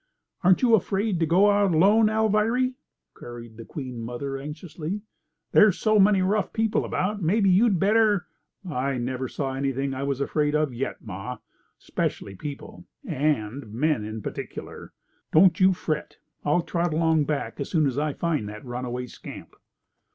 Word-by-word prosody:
"Ain't 185 +6 +4
you 240 -2 +4
afraid 200 -2 +1
to 165 - +1
go 190 +6 +5
out 200 -4 +2
alone, 210 +7 +5
Alviry?" 220 +4 +2 0.4
queried 120 -2 -10
the 115 - -9
Queen 130 -6 -6
mother 125 +4 -4
anxiously. 155 +6 -6 0.5
"There's 210 -4 +6
so 215 -1 +3
many 195 -1 +5
rough 200 +1 0
people 225 -1 +1
about. 205 +3 -2
Mebbe 195 +6 +2
you'd 195 +1 +4
better—" 210 -1 +3 0.4
"I 135 -3 -1
never 130 +1 -3
saw 135 +1 -3
anything 135 0 -1
I 130 - -4
was 140 -1 -1
afraid 150 +1 0
of 150 -4 +1
yet, 125 +3 -4
ma. 110 +5 -6 0.4
'Specially 100 - -3
people. 145 - -8 0.2
And 135 -6 -1
men 135 0 0
in 110 0 -6
particular. - - -7 0.4
Don't 170 +2 +5
you 190 0 +6
fret. 155 -4 -3 0.3
I'll 150 +4 +2
trot 170 -2 -1
along 160 -2 +2
back 150 -1 -3
as 140 - -3
soon 155 -3 +2
as 135 0 0
I 150 -1 -1
find 155 -11 -1
that 105 +4 -9
runaway 125 0 -4
scamp." 125 - -11
155 Hz, 160 wpm, -25 LUFS, 130-195 Hz, 0.5 s, There's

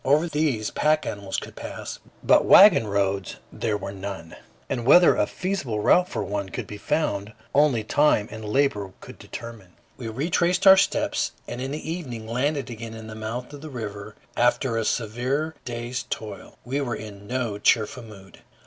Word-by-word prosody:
Over 150 +5 +3
these 145 -9 0
pack 155 0 +2
animals 100 -2 -4
could - - -6
pass, - - -7 0.2
but - - +5
wagon 190 - +8
roads 100 -2 -1 0.2
there 110 -2 -1
were 100 -1 -6
none; 95 -4 -7 0.3
and 120 -3 -2
whether 175 +8 +7
a - - +1
feasible 175 - -3
route 180 +11 +4
for - - -3
one 100 0 -3
could - - -5
be 105 - -9
found, 110 -8 -1 0.2
only 140 -6 +3
time 125 -3 +3
and 110 0 -8
labor 105 -4 0
could - - -12
determine. 110 -6 -9 0.2
We 120 - -6
retraced 170 - 0
our 190 0 +10
steps, 190 - +1
and 120 - -5
in 135 - -3
the 150 +3 -5
evening 135 -10 -5
landed 135 +2 -1
again 115 0 -7
at 110 0 -9
the 110 - -8
mouth 115 +5 -5
of 145 - -9
the 155 - -8
river 105 -4 -7 0.2
after 120 0 +2
a 115 -1 0
severe 125 +9 -1
day's 120 +1 -4
toil. 105 -4 -7
We 135 +4 -1
were 120 -4 -2
in 100 -2 -10
no 120 -4 -2
cheerful 110 +3 +2
mood. 100 -4 -14
115 Hz, 175 wpm, -25 LUFS, 105-145 Hz, 0.3 s, our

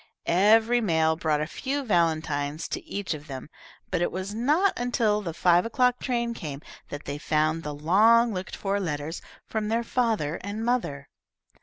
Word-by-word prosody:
Every 220 +6 +4
mail 160 -5 +2
brought 155 -2 0
a - - 0
few 275 - -3
valentines 160 - 0
to - - -4
each 200 -4 -3
of 150 0 -9
them, 135 +1 -8 0.4
but 180 -2 0
it 175 - +1
was 190 +3 -4
not 300 - +2
until 225 -4 +1
the 175 -5 -4
five 175 +1 +3
o'clock 250 +1 +1
train 235 -2 -1
came 150 -9 -7 0.3
that 145 0 -7
they 145 +1 -4
found 155 +2 +1
the 150 -2 -5
long 220 +9 +4
looked 185 0 -5
for 200 0 -1
letters 160 -2 -4 0.2
from 215 -1 -3
their 230 +2 0
father 225 - 0
and 210 +3 -4
mother. 190 - -1
185 Hz, 170 wpm, -26 LUFS, 155-230 Hz, 0.4 s, Every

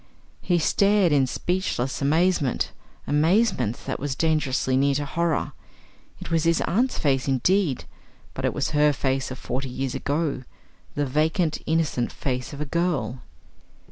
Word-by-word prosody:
He 175 - +1
stared 200 +2 +3
in 140 -3 +3
speechless 160 -5 -2
amazement 155 -1 +1 0.3
amazement 155 - +2
that - - -3
was 140 -1 -3
dangerously 150 -5 +1
near 140 +1 +3
to 145 +1 -1
horror. 170 +2 -1 0.7
It - - -8
was 165 -1 +2
his 165 0 +3
aunt's 245 +8 +1
face 135 -3 +1
indeed, 145 +2 +1 0.5
but - - -6
it - - +2
was - - -2
her 150 0 +4
face 135 -1 -1
of 130 - -6
forty 130 +1 -4
years 130 +1 -3
ago, 145 -2 -1 0.5
the 145 - 0
vacant 155 +4 0
innocent 155 -7 0
face 125 -2 -3
of 145 - -8
a 150 - -2
girl. 140 -7 -1
145 Hz, 145 wpm, -24 LUFS, 135-170 Hz, 0.7 s, her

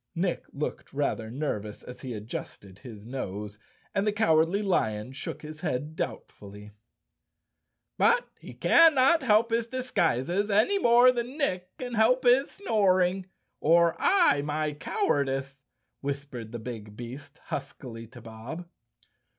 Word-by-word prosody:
Nick 175 +1 -1
looked 150 - -5
rather 135 -6 -1
nervous 110 -6 -4
as 125 - -10
he 125 -4 -5
adjusted 100 -2 -8
his 110 -4 -11
nose, 105 -4 -6 0.3
and 200 +1 0
the - - +4
Cowardly 185 -1 +2
Lion 110 - 0
shook 140 +3 -7
his 155 +1 -9
head 150 -2 -3
doubtfully. 105 -7 -7 1.3
"But - - +4
he - - -11
cannot 320 -1 +5
help 230 -2 +3
his 230 0 +1
disguises 200 - 0
any 220 - +3
more 245 -3 +6
than 245 +3 -4
Nick 185 - -2
can 245 -1 -6
help 235 +3 +3
his 255 +3 +4
snoring, 190 - +1 0.3
or 170 +1 +4
I, 350 - +4
my 150 +1 -2
cowardice," 140 - -1 0.4
whis¬ 140 0 -3
pered 120 -6 -8
the 120 - -5
big 110 -3 -8
beast 125 +4 -9
huskily 115 -2 -7
to 120 +2 -13
Bob. 115 +10 -8
155 Hz, 135 wpm, -28 LUFS, -, 1.3 s, more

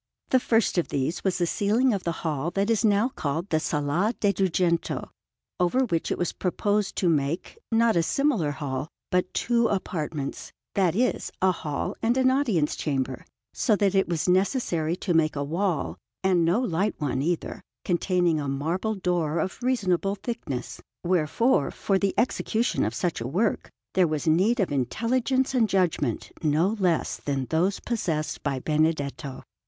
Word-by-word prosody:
The 260 - +5
first 225 -6 +2
of 170 - -1
these 140 +5 -2
was 190 -2 +1
the 175 - +1
ceiling 220 +8 +2
of 195 - -3
the 170 - +1
hall 155 0 -1
that 200 +3 +1
is 225 0 +2
now 215 +3 +3
called 165 - -3
the 155 - +3
Sala 155 +10 0
de' 205 -1 +2
Dugento, 180 -3 0 0.5
over 180 +9 +2
which 170 -8 -1
it - - 0
was 175 - -1
proposed 205 +2 0
to 185 - +1
make, 160 - -1
not 225 -1 +3
a 170 - +4
similar 230 - +1
hall, 140 -1 -3 0.2
but 180 0 +1
two 235 -1 +2
apartments, 160 -8 -3 0.2
that 185 -4 +2
is, 250 +4 0
a 190 0 +4
hall 150 -5 -3
and 235 +3 +2
an 260 0 +4
audience 225 - +1
chamber, 135 -3 -2 0.3
so 215 - +2
that 200 -2 +2
it 195 -2 +2
was 170 -1 -1
necessary 180 - +1
to 180 0 -2
make 155 -2 +2
a 140 - -1
wall, 155 - -1 0.2
and 185 -3 +3
no 170 +7 +3
light 200 -3 0
one 135 -3 -1
either, 170 +3 -2 0.2
containing 175 -2 +1
a 145 - -3
marble 170 +10 -1
door 175 -4 0
of 185 +9 -2
reasonable 200 -6 +1
thickness; 195 - -5 0.2
wherefore, 180 - +2
for 195 -1 0
the 195 -1 0
execution 235 -1 +1
of 110 +2 -1
such 170 -4 -1
a 115 - -3
work, 195 - 0 0.2
there 185 -2 +4
was 155 -2 -2
need 195 +10 +3
of 195 - +1
intelligence 245 - 0
and 230 -4 +3
judgment 170 - 0
no 155 +4 +2
less 175 -4 +1
than 140 -2 -2
those 180 +5 +1
possessed 165 -10 -2
by 140 -2 -1
Benedetto. 150 -2 -1
180 Hz, 170 wpm, -26 LUFS, 155-210 Hz, 0.5 s, The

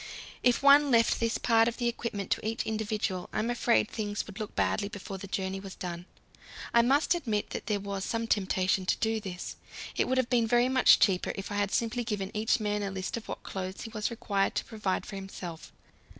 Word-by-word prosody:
If 245 +2 +3
one 285 +1 +7
left 230 -2 +4
this 230 -1 +1
part 225 -1 +4
of 235 - -2
the 240 - 0
equipment 230 -4 -3
to - - +1
each 220 +1 -1
individual, 215 -4 -2
I - - -4
am 230 +3 0
afraid 240 -2 +2
things 205 -2 -3
would 210 +1 -10
look 215 - -5
badly 200 - +1
before 195 -2 -7
the 195 - -7
journey 190 0 -2
was 195 -1 -9
done. 175 -1 -6 0.7
I 235 - +7
must 275 +8 +3
admit 225 -12 -2
that - - -5
there 210 -2 +1
was 200 -1 -4
some 230 +3 -1
temptation 190 -3 +1
to - - +2
do 225 0 0
this. 185 -4 -6 0.4
It - - +1
would 260 - +1
have 260 -2 +2
been 235 -2 +3
very 240 +2 +3
much 260 -1 +6
cheaper 185 -3 +2
if 195 0 -6
I - - -2
had 205 -1 +1
simply 240 +1 0
given 205 -4 -3
each 215 +2 +1
man 210 -1 -1
a 200 - -2
list 190 -1 -4
of 230 - -7
what - - -6
clothes 190 0 -5
he 225 - -7
was 215 -2 -1
required 205 -4 -1
to - - -1
provide 210 -4 -2
for 200 - -7
himself. 185 -4 -8
210 Hz, 220 wpm, -29 LUFS, 195-235 Hz, 0.7 s, one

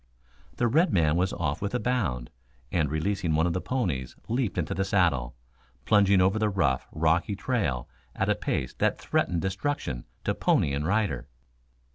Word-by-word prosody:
The 120 - +1
red 160 +10 +3
man 80 -4 +3
was 90 +2 +1
off 75 -4 -2
with 100 +4 -2
a - - +1
bound, 95 - -1 0.4
and 80 -5 +1
releasing 85 +2 0
one 80 +2 +3
of 85 - +1
the 90 - -2
ponies 85 - -2
leaped 120 -4 -1
into 85 -3 -1
the 95 - 0
saddle, 85 - +1 0.5
plunging 100 -2 +5
over 95 +4 +3
the 110 -1 +2
rough, 85 -10 0
rocky 80 +5 +1
trail 90 - -1 0.3
at - - 0
a - - +4
pace 65 - -2
that - - +1
threatened 85 -2 0
destruction 95 - -2 0.2
to - - 0
pony 70 - +2
and 75 +2 -1
rider. 105 - 0
90 Hz, 170 wpm, -27 LUFS, 75-105 Hz, 0.5 s, plunging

